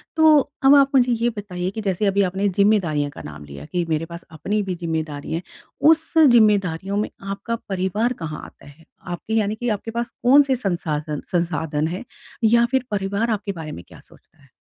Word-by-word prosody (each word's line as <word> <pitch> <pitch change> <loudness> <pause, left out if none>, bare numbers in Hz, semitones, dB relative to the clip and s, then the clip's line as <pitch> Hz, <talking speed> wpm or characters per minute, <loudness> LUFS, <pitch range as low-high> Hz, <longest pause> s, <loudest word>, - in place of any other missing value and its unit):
तो 315 -2 +6 0.3
अब 275 +1 +8
आप 280 -1 +5
मुझे 250 -2 +4
ये 235 +1 +1
बताइए 180 -3 -4
कि 220 +2 -5
जैसे 195 0 -1
अभी 200 0 +2
आपने 190 +2 0
ज़िम्मेदारियाँ 185 -7 +2
का - - -10
नाम 75 0 -9
लिया, 70 0 -10
कि 175 - -2
मेरे 160 0 0
पास 170 +1 -10
अपनी 205 +7 -2
भी 190 -2 -3
ज़िम्मेदारियाँ 160 -3 -4
है 170 - -2 0.5
उस 320 0 +2
ज़िम्मेदारियों 205 - +4
में 210 - -1 0.2
आपका 200 +4 -3
परिवार 195 +6 0
कहाँ 155 -1 -5
आता - - -16
है? 155 +3 -17 0.2
आपके 175 +5 -5
यानी 215 -1 +1
कि 240 +2 -3
आपके 220 +1 -3
पास 235 +1 -3
कौन 275 +4 +7
से 270 -2 +1
संसाधन 155 - -3
संसाधन 160 -3 -1
हैं 180 +8 -5 0.4
या 235 +2 +5
फिर 265 -2 +2
परिवार 200 +3 -1
आपके 205 -1 -2
बारे 160 -5 -7
में 85 - -8
क्या - - -15
सोचता - - -22
है? 140 - -23
195 Hz, 195 wpm, -22 LUFS, 165-225 Hz, 0.5 s, अब